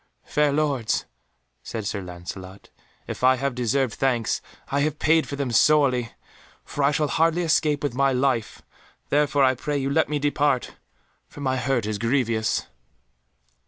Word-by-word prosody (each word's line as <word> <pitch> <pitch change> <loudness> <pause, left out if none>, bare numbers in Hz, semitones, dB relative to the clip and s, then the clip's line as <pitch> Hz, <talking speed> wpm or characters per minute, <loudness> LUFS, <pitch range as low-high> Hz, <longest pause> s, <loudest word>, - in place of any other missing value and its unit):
"Fair 150 -1 +2
Lords," 140 -6 0 0.6
said 110 -3 -6
Sir 100 0 -3
Lancelot, 90 +2 -9 0.3
"if - - -7
I 130 0 +6
have 135 +1 -2
deserved 125 0 0
thanks, 120 -3 0 0.3
I 140 - +1
have 150 0 0
paid 160 +1 +3
for 140 - -5
them 140 -3 -2
sorely, 130 -2 +3 0.5
for 145 - -3
I 140 - +5
shall 150 0 +1
hardly 165 +4 +2
escape 155 -3 +1
with 145 - -1
my 135 +2 +2
life, 125 -4 -1 0.5
therefore 145 -1 +2
I 130 -1 +5
pray 145 +3 -3
you 135 0 -1
let 160 +1 +2
me 150 - 0
depart, 145 -2 0 0.5
for 145 - -12
my 130 -1 0
hurt 125 -2 0
is 105 -1 -3
grievous." 115 -2 0
135 Hz, 160 wpm, -24 LUFS, 120-145 Hz, 0.6 s, I